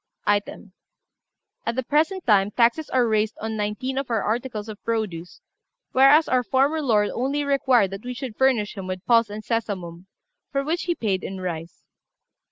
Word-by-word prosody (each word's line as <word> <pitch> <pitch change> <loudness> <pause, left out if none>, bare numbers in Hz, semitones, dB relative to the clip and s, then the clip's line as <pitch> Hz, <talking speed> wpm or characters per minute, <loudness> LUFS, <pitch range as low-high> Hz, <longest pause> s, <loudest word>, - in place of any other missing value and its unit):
] - - -45
"Item. 205 -1 -6 0.9
At 230 - -2
the 260 - -1
present 315 +8 0
time, 205 -4 +4
taxes 240 +8 +2
are 250 -2 +2
raised 215 0 +1
on 220 0 -4
nineteen 220 +6 -2
of 275 - -5
our 225 -3 0
articles 225 -1 -2
of 215 -1 -9
produce; 205 -7 -3 0.5
whereas 275 +4 +6
our 255 -1 +2
former 275 +6 +1
lord 215 -7 +2
only 275 +4 -1
required 265 -7 +2
that 195 +1 -7
we 250 0 -5
should 255 -4 -6
furnish 250 -5 +1
him 195 -2 -6
with 185 -1 -5
pulse 230 -2 +4
and 210 +1 -7
sesamum, 190 -6 -3 0.4
for 275 0 0
which 325 +4 -2
he 345 -1 0
paid 195 - -1
in 190 0 -5
rice. 170 -2 -6
230 Hz, 175 wpm, -24 LUFS, 205-265 Hz, 0.9 s, whereas